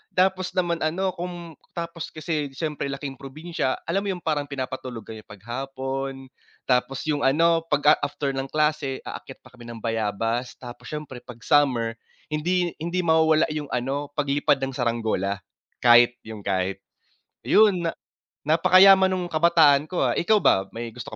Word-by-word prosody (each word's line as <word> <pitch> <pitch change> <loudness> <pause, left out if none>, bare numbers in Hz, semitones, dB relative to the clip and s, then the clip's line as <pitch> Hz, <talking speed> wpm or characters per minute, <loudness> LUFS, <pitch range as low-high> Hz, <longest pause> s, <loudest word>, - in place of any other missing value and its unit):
tapos 185 0 +1
naman 175 -2 0
ano 185 +5 0
kung 175 -2 -8 0.2
tapos 170 -1 -5
kasi 155 -2 -3
siyempre 150 -1 -3
laking 135 0 -6
probinsya, 145 0 -3
alam 175 +4 0
mo 200 -2 -2
yung 175 - -11
parang 150 -3 -1
pinapatulog 130 -4 -5
kami 110 -1 -9
'pag 100 -2 -14
hapon. 135 +1 -5 0.3
Tapos 130 +1 0
yung 150 -2 -1
ano 165 +5 +3
'pag 145 -2 0
a - - +8
after 145 -1 -2
ng 135 0 -4
klase 150 -2 -1
aakyat - - -9
pa - - -17
kami 120 -2 -13
ng 115 -2 -9
bayabas. 115 +2 -2
Tapos 120 -1 -11
siyempre 150 -4 -7
'pag 120 -1 -13
summer, 120 -6 +2 0.3
hindi 175 +3 0
hindi 175 +3 -2
mawawala 160 -1 +4
'yong 150 -2 -4
ano 135 +4 -2
paglipad 145 0 +2
ng 135 - -2
saranggola, 115 -6 -1 0.5
kite 120 0 +6
yung 110 -1 -8
kite. 95 -1 -2 0.7
Yun, 200 -5 +4
na 165 - 0 0.5
napakayaman 185 +5 +6
nung 175 -2 -4
kabataan 155 -3 +4
ko, 180 - -1
ah, - - +1
ikaw 210 +3 +2
ba 95 0 +3
may 115 0 -5
gusto 115 -1 -9
145 Hz, 160 wpm, -24 LUFS, 125-170 Hz, 0.7 s, a